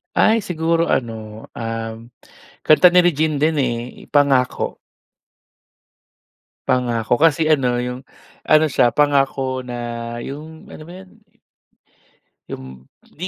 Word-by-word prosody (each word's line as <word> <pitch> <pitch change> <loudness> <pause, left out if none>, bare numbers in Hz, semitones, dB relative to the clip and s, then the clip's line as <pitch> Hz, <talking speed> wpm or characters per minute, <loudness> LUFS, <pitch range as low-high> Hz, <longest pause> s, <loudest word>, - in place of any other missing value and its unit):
Ay 225 +1 +4
siguro 165 -3 -1
ano, 110 -3 -3
um, 115 0 -6 0.6
kanta 155 +4 +6
ni 180 - +5
Regine 160 -2 +1
din, 155 +2 +2
eh, 120 -2 -4
Pangako. 140 -3 +1 1.9
Pangako 120 -3 0
kasi 160 0 +3
ano, 135 -6 +2
'yung 125 +1 -4 0.4
ano 155 0 +4
siya 130 -5 +2
Pangako 135 -1 +1
na 125 -1 -8 0.5
'yung 155 +3 -9
ano - - -11
ba 165 - -13
'yun? 190 0 -14 1.4
'Yung 65 0 -9 0.2
hindi 180 +5 -6
135 Hz, 110 wpm, -20 LUFS, 120-160 Hz, 1.9 s, kanta